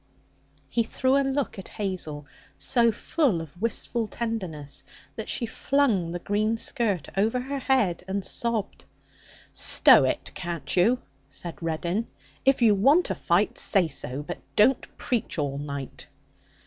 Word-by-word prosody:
He 230 - +1
threw 260 +3 +1
a 280 - +4
look 270 -5 -1
at 190 - -8
Hazel 175 -8 -3 0.3
so 230 - +3
full 245 - 0
of 165 +3 -10
wistful 230 0 -1
tenderness 185 -12 -4 0.3
that - - -6
she 240 - 0
flung 230 -7 +1
the 175 - -3
green 210 +5 0
skirt 205 -8 -1
over 220 +6 +2
her 275 +2 -4
head 250 -11 +1
and 195 0 -2
sobbed. 230 -3 -3 0.7
'Stow - - +6
it, - - -2
can't 170 -5 -4
you?' 225 +8 +3 0.3
said 165 +1 -6
Reddin. 170 +6 -2 0.4
'If 270 -2 +3
you 220 -3 +6
want 275 - +4
a - - +2
fight, - - +1
say 190 -5 +4
so; 140 -2 -3
but 175 +3 -6 0.2
don't 250 +5 +4
preach 240 -7 -2
all 140 -2 -1
night.' 140 -2 -6
205 Hz, 145 wpm, -26 LUFS, 170-240 Hz, 0.7 s, Stow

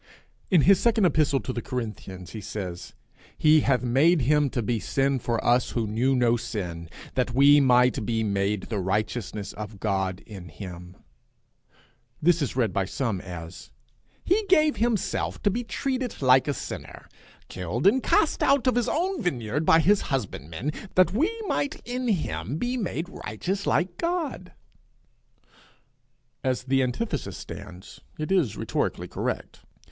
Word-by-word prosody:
In 180 -6 +5
his 195 +4 +5
second 225 -4 +3
epistle 150 -5 +3
to 130 - -4
the 120 - -3
Corinthians 105 -8 -6
he 110 - -7
says, 90 -5 -6 0.4
'He 155 0 +5
hath 135 -3 +1
made 145 +7 +4
him 145 +2 +3
to 120 - -2
be 115 +1 0
sin 135 +4 0
for 115 0 -1
us 120 +1 +2
who 115 -2 0
knew 120 +6 +1
no 120 -1 +3
sin, 90 -8 -5 0.2
that 125 -2 -1
we 140 +2 +7
might 125 -2 +4
be 115 +1 0
made 100 -1 0
the 110 -3 -3
righteousness 105 +2 -2
of 105 -1 -8
God 95 -2 -1
in 95 -6 -10
him;' 90 +3 -9 1.2
'He 170 +3 +5 2.2
gave 310 -5 +4
him 235 +1 +2
to 205 - -2
be 240 +5 -2
treated 255 0 -3
like 130 0 +5
a 145 - +1
sinner, - - -8 0.4
killed 95 - -4
and 240 +7 +5
cast 320 - +2
out 275 -2 +3
of 255 - +3
his 245 0 +1
own 365 +3 -1
vineyard 140 - -2
by 160 - +7
his 195 +5 +4
husbandmen, 105 - -3 0.2
that 185 +1 +4
we 300 - +2 0.2
might 285 -7 -1
in 250 +1 -3
him 140 - -1
be 245 +7 -1
made 185 -7 -2
righteous 190 - -4
like 175 +5 0
God.' 330 - -2 1.9
As 130 -1 0
the 135 +1 +2
antithesis 130 - -2
stands 95 -2 -10 0.2
it 155 +4 -4
is 170 - +2
rhetorically - - -2
correct. - - -4
130 Hz, 140 wpm, -26 LUFS, -, 2.2 s, we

